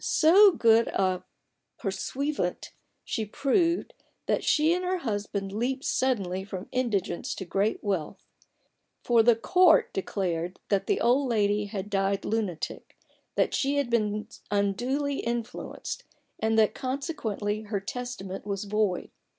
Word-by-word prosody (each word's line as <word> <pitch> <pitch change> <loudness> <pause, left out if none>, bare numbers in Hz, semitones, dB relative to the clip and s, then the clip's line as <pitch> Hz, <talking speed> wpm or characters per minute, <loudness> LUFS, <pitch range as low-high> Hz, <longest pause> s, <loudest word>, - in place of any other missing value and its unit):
So 375 +6 +6
good 230 -4 +4
a 185 -1 0 0.5
pursuivant 200 +2 -2
did - - -10 0.3
she 225 - -2
prove, 335 - +1 0.3
that - - 0
she 310 +2 +3
and 360 +1 -1
her 365 +1 0
husband 205 - -3
leaped 250 +6 -2
suddenly 195 -8 0
from 190 -1 -7
indigence 210 -9 -1
to 190 - -6
great 200 +4 0
wealth: 190 -7 -3 0.8
for 235 -2 +5
the 235 +1 +5
Court 340 +8 +4
declared 180 -2 -2
that 200 -2 +1
the 405 - +2
old 255 +3 +3
lady 210 -2 +2
had 200 -1 -5
died 195 0 0
lunatic; 205 -7 -3 0.4
that - - +2
she 280 +1 +1
had 275 -4 0
been 210 -2 0 0.2
unduly 245 +8 0
influenced; 235 0 -4 0.4
and, 220 0 +1
that 215 -1 +4
consequently 255 - -3
her 205 -1 -2
testament 195 -2 -6
was 200 -1 -3
void. 205 -3 -1
215 Hz, 135 wpm, -27 LUFS, 195-260 Hz, 0.8 s, So